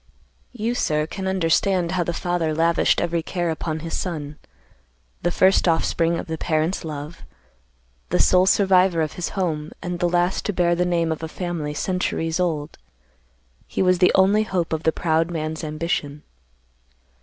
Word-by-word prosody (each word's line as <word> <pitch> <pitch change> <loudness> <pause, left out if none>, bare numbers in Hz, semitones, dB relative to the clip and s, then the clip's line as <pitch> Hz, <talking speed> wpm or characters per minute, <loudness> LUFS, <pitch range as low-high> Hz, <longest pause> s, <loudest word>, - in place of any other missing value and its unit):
"You, 235 -1 -2
sir, 150 -10 0
can 190 +4 -5
understand 185 0 +1
how 185 -1 +1
the 170 - -2
father 170 -2 -1
lavished 165 +1 +2
every 170 -1 0
care 175 0 -2
upon 160 0 -4
his 165 0 -4
son. 150 -5 -4 0.8
The 175 - +1
first 190 +2 +3
offspring 165 0 +1
of - - -5
the 160 -1 -5
parents' 160 +3 0
love, 150 0 -7 0.9
the - - +1
sole 185 0 +4
survivor 185 -4 +4
of 155 - -4
his 180 - -3
home, 155 -5 -1
and 175 -1 -4
the 175 - +1
last 175 +1 +1
to 205 - -1
bear 175 -1 +2
the 175 +1 +1
name 170 -2 +1
of 160 - -3
a 160 - -3
family 160 -3 -4
centuries 175 -1 -1
old, 160 -4 -2 0.9
he - - -1
was 185 -1 +3
the 180 - +5
only 195 +3 +4
hope 185 -7 -1
of 160 - -1
the 160 - +2
proud 160 0 0
man's 160 -1 -4
ambition. 155 -2 -3
170 Hz, 165 wpm, -22 LUFS, 160-180 Hz, 0.9 s, the